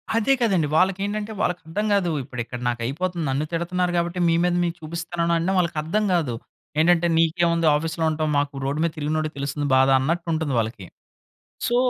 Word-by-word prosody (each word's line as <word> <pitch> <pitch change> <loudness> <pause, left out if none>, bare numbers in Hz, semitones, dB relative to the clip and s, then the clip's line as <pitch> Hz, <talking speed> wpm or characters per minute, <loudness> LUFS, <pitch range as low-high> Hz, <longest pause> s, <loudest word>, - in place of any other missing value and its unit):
అదే 230 +4 +3
కదండీ 190 -10 +2
వాళ్ళకేంటంటే 200 +4 +1
వాళ్ళకర్థం 180 +3 -2
కాదు. 190 -4 +2
ఇప్పుడు 125 -2 -6
ఇక్కడ 125 +1 -7
నాకైపోతుంది, 150 +9 -2
నన్ను 135 +3 0
తిడుతున్నారు 180 +1 0
కాబట్టి 170 +1 -1
మీ 165 - +3
మీద 180 0 +2
మీకు 170 -1 -1
చూపిస్తున్నానన్నా 170 +2 -1
వాళ్ళకర్థం 170 +3 0
కాదు. 160 -9 +1 0.5
ఏంటంటే 170 +1 +4
నీకేముంది 165 0 +2
ఆఫీస్‌లో 160 +2 -2
ఉంటాం. 155 0 -1
మాకు 145 0 0
రోడ్డు 140 +2 -1
మీద 170 - +1
తిరిగినోడికి 155 +1 -1
తెలుస్తుంది 140 +1 -2
బాధ 130 +1 +5
అన్నట్టుంటుంది 160 0 -1
వాళ్ళకి. 110 -3 -3 0.8
సో, 240 - +1
165 Hz, 150 wpm, -23 LUFS, 150-175 Hz, 0.8 s, బాధ